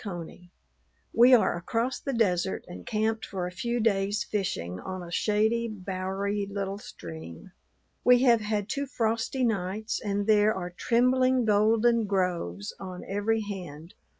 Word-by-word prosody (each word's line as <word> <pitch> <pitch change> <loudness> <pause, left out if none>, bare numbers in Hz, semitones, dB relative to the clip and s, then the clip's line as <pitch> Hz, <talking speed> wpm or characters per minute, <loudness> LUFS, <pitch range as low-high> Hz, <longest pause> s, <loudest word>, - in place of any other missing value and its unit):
CONEY, 175 -2 -7 0.6
We 250 +2 +8
are 230 - +2
across 230 +9 -2
the 275 - -3
desert, 190 -6 0
and 175 - -10
camped 220 0 0
for 185 -2 -4
a 180 - -4
few 235 +6 -2
days' 205 -2 +1
fishing 90 - -3
on 185 -1 -6
a 170 - -9
shady, 220 +5 +1
bowery 195 0 -3
little 200 0 -3
stream. 80 - -10 0.5
We 250 0 +6
have 235 -4 +5
had 210 -1 -1
two 280 +3 -2
frosty 230 +1 -1
nights 215 -1 -1
and 205 -1 -1
there 215 0 +4
are 180 -1 -4
trembling 255 +5 +2
golden 220 +2 +3
groves 175 - -2
on 185 -2 -7
every 210 +3 0
hand. 180 -6 -7
205 Hz, 145 wpm, -28 LUFS, 185-225 Hz, 0.6 s, We